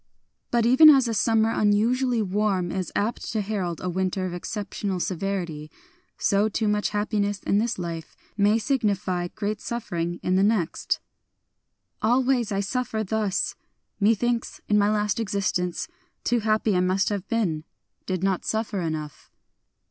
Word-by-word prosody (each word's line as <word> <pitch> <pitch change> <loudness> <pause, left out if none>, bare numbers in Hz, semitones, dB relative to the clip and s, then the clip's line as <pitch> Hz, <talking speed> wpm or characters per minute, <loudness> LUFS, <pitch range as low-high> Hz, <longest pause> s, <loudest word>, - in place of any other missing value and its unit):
But 235 -1 +2
even 260 +6 +8
as 270 -4 +6
a 230 - -1
summer 220 +1 +2
unusually 230 +4 +2
warm 190 -2 0
is 185 -1 -3
apt 215 +4 -1
to 220 - +1
herald 195 -5 -3
a - - -2
winter 185 +1 -1
of 180 - -4
exceptional 200 0 -4
severity, 175 -5 -3 0.5
so 205 +2 +2
too 220 +1 -1
much 210 0 +1
happiness 205 -1 -1
in 200 - +2
this 235 +2 -1
life 165 -3 -6 0.2
may 205 +1 +3
signify 210 -8 0
great 210 +2 -4
suffering 175 -7 -3
in 185 +1 +2
the - - +4
next: 205 -6 0 0.5
— - - -49
Always 245 0 +2
I 195 0 0
suffer 225 +1 -2
thus!... 215 -1 -1 0.5
Methinks, 230 +3 +1
in 210 0 +3
my 205 0 +3
last 210 0 0
existence. 195 -5 -1 0.4
Too 240 0 +2
happy 215 -1 +1
I - - +3
must 185 +2 +2
have 200 -2 -3
been, 180 -10 0 0.2
— - - -50
did 185 -1 -2
not 195 -2 +1
suffer 220 -3 -2
enough. 155 -3 -5
205 Hz, 155 wpm, -25 LUFS, 185-220 Hz, 0.5 s, even